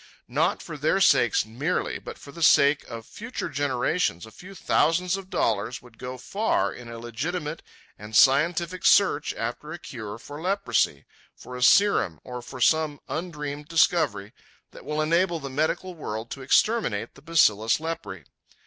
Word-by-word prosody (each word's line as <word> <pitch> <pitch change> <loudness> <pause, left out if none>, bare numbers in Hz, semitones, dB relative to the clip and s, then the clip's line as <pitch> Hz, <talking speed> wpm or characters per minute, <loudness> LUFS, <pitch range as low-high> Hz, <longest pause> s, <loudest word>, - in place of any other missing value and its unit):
Not - - 0
for 150 - -7
their 155 +7 +2
sakes 130 - +4
merely, 140 +11 -2
but - - -9
for 140 - -12
the 170 - -10
sake 140 -2 +5
of 115 -2 -7
future 230 - -6
generations, 140 - -1
a 110 - -14
few 185 - -13
thousands 180 +2 +1
of 195 -1 -8
dollars 115 - -1
would 120 -2 -18
go 125 +1 -6
far 195 - -1
in 120 -1 -11
a 115 - -7
legitimate 150 +8 -4 0.4
and 105 +1 -8
scientific 170 +7 +3
search 180 -7 +4
after 120 +6 -5
a 170 - -5
cure 110 -10 -8
for 145 +6 -10
leprosy, 195 +3 0 0.3
for 125 - -10
a 125 - -6
serum, 125 - +4
or 125 -1 -7
for 130 +2 -10
some 155 +2 +2
undreamed 150 -3 -5
discovery 155 - +1 0.4
that - - -13
will 150 0 -1
enable 170 +2 +1
the 140 -2 -7
medical 160 +6 -1
world 115 -8 -6
to 135 - -6
exterminate 130 - +1
the 135 - -17
bacillus 115 -9 +3
lepræ. 165 +1 -6
145 Hz, 160 wpm, -25 LUFS, 120-170 Hz, 0.4 s, sake